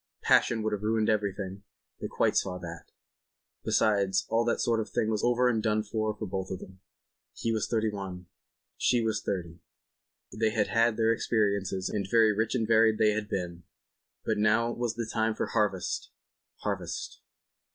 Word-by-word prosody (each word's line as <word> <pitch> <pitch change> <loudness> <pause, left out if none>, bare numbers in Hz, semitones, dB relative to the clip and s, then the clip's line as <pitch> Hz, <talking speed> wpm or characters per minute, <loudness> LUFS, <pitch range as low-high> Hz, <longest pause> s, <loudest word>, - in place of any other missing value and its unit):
Passion 115 -2 +3
would 110 0 0
have 105 - -2
ruined 110 0 +1
everything; 100 -2 -1 0.4
they - - -3
quite - - +1
saw 90 -1 0
that. 85 -1 -9 0.7
Besides, 100 -2 +2
all 115 +1 +2
that 120 - +1
sort 115 -1 +1
of 110 - -3
thing 110 - 0
was 110 -1 -1
over 125 +1 +3
and 115 -3 +1
done 110 -1 +1
with 105 - -12
for 110 -1 -1
both 95 -1 -4
of 95 - -3
them—he 95 +4 -9
was 110 -2 0
thirty 110 -2 0
one, 95 -3 -6 0.5
she 120 -2 +2
was 110 -1 0
thirty—they 90 +4 -5
had 110 -1 0
had 115 -1 +2
their 115 0 +3
experiences, 100 -4 0
and 100 -2 -2
very 110 -1 +5
rich 110 +4 0
and 115 -3 0
varied 110 -1 +4
they 110 -1 +4
had 105 0 -3
been, 90 -3 -3 0.6
but - - 0
now 110 +3 +3
was 120 -1 -2
the 115 -2 -3
time 110 0 0
for - - -1
harvest—harvest. 105 -5 -4
110 Hz, 165 wpm, -29 LUFS, 100-115 Hz, 0.7 s, very